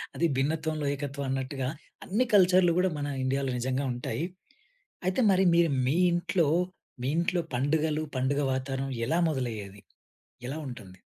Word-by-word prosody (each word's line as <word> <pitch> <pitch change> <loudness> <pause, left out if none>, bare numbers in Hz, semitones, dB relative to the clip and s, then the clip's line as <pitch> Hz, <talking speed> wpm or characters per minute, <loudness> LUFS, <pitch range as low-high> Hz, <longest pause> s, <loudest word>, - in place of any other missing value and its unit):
అది 170 - +1
భిన్నత్వంలో, 155 +2 -1
ఏకత్వం 140 0 -4
అన్నట్టుగా. 135 0 -2 0.4
అన్ని 220 +7 +1
కల్చర్‌లు 180 -2 +5
కూడా 185 +1 +3
మన 145 0 -2 0.2
ఇండియాలో 135 0 0
నిజంగా 130 +3 -1
ఉంటాయి. 125 +5 -3 0.8
అయితే, 185 +7 +1
మరి 190 0 +4
మీరు 170 -1 +4 0.2
మీ 135 - +2 0.2
ఇంట్లో, 175 -1 +1 0.6
మీ 130 - 0
ఇంట్లో 175 +1 +1
పండుగలు 150 +3 +1
పండుగ 135 +3 +1
వాతావరణం 135 +1 -3 0.2
ఎలా 165 - +2
మొదలయ్యేది? 110 -8 -4 0.7
ఎలా 140 +4 -4
ఉంటుంది? 100 -8 -10
140 Hz, 135 wpm, -28 LUFS, 130-170 Hz, 0.8 s, కల్చర్‌లు